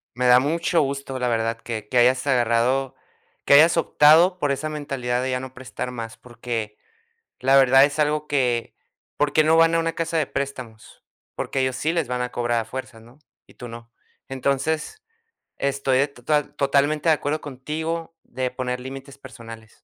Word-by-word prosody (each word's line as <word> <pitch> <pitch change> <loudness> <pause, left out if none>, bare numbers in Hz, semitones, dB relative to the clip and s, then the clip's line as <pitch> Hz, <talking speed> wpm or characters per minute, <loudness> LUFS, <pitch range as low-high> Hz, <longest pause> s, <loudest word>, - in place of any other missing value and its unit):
Me 125 0 0
da 125 0 +7
mucho 165 +3 +1
gusto, 135 -1 -4
la 125 -1 -1
verdad, 115 0 0
que 110 -3 -6
que 125 - -4
hayas 130 +3 +4
agarrado, 125 +1 +1 0.5
que 140 - +6
hayas 160 +4 +6
optado 165 +4 +5
por 145 -4 0
esa 155 +3 -3
mentalidad 135 -5 -3
de 130 - -2
ya 125 0 -1
no 130 0 -9
prestar 130 -1 -6
más, 115 -2 -7
porque 115 -3 -6 0.6
la 135 +1 +3
verdad 135 0 +6
es 145 +1 -1
algo 150 0 0
que, 125 -5 -1 0.4
¿por 145 0 0
qué 155 - +4
no 160 +1 +4
van 165 0 +5
a - - +3
una 165 0 0
casa 165 0 -2
de 155 -4 +1
préstamos? 130 -5 -7 0.3
Porque 135 - -3
ellos 130 -1 0
sí 155 +5 -1
les 165 -7 -1
van 125 0 -2
a 125 - -4
cobrar 120 -1 0
a - - -5
fuerzas, 115 -1 -8
¿no? 120 +5 -19 0.3
Y - - -20
tú 120 - -9
no. 115 0 -11 0.4
Entonces, 140 - -2 0.6
estoy 140 -1 0
de 140 - +3
total 140 +2 -2
totalmente 145 +3 +1
de 160 - +6
acuerdo 150 +1 -3
contigo 160 +5 -5
de 130 0 -4
poner 125 -1 -3
límites 135 +2 -9
personales. 115 -4 -12
135 Hz, 185 wpm, -23 LUFS, 125-150 Hz, 0.6 s, da